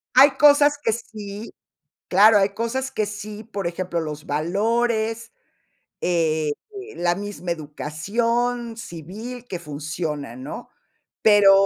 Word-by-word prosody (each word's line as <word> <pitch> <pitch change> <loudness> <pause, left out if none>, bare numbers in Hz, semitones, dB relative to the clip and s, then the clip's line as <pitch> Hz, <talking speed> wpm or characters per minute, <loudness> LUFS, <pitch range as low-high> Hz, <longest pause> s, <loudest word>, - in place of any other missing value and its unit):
Hay 275 +2 +9
cosas 290 0 +6
que 255 -6 0
sí. 215 -2 -7 0.5
Claro, 205 +3 +7
hay 195 0 +3
cosas 235 +5 -2
que 215 - -1
sí, 210 +1 -7
por 200 -5 -4
ejemplo, 175 0 -2
los 150 -1 -6
valores, 220 - 0 0.7
eh, 160 -3 +1 0.4
la 175 0 +2
misma 200 -2 -5
educación 230 +11 -1
civil 225 +7 -8
que 180 - -4
funciona, 150 -4 -4
¿no? 140 - -7 0.5
Pero, 205 -2 +7
205 Hz, 115 wpm, -23 LUFS, 165-230 Hz, 0.7 s, Hay